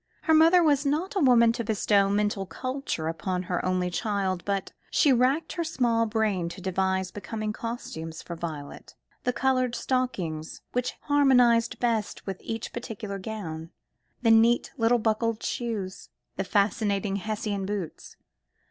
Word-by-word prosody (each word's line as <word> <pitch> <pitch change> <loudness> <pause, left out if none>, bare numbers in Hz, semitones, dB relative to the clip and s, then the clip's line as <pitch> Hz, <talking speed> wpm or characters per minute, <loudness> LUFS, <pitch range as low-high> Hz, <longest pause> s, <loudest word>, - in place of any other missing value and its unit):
Her 320 - +3
mother 330 +3 +6
was 290 -3 +3
not 310 +8 -1
a - - +2
woman 240 -6 +6
to 235 0 -3
bestow 205 -2 +2
mental 205 -1 0
culture 255 - -3
upon 180 +3 -2
her 180 -1 -2
only 185 -1 0
child, 190 -2 -1
but 200 -1 -2 0.2
she 285 -4 +4
racked 255 +6 +2
her 340 - -1
small 235 -7 +1
brain 210 -6 0
to 170 - -9
devise 190 0 -1
becoming 215 +2 -4
costumes 165 -10 -6
for 170 - -6
Violet: 155 -4 -7 0.3
the 250 - +3
coloured 255 -1 +1
stockings 180 -12 -2
which 250 0 -1
harmonised 250 -5 +4
best 230 -3 -1
with 195 -2 -5
each 225 0 -5
particular 215 -4 -5
gown, 170 -6 -6 0.5
the 225 - +5
neat 230 +2 +4
little 240 -1 +3
buckled 225 0 0
shoes, 215 -6 -4 0.3
the 195 - -1
fascinating 200 0 +1
Hessian 205 -1 -3
boots. 200 -6 -5
215 Hz, 145 wpm, -27 LUFS, 190-245 Hz, 0.5 s, mother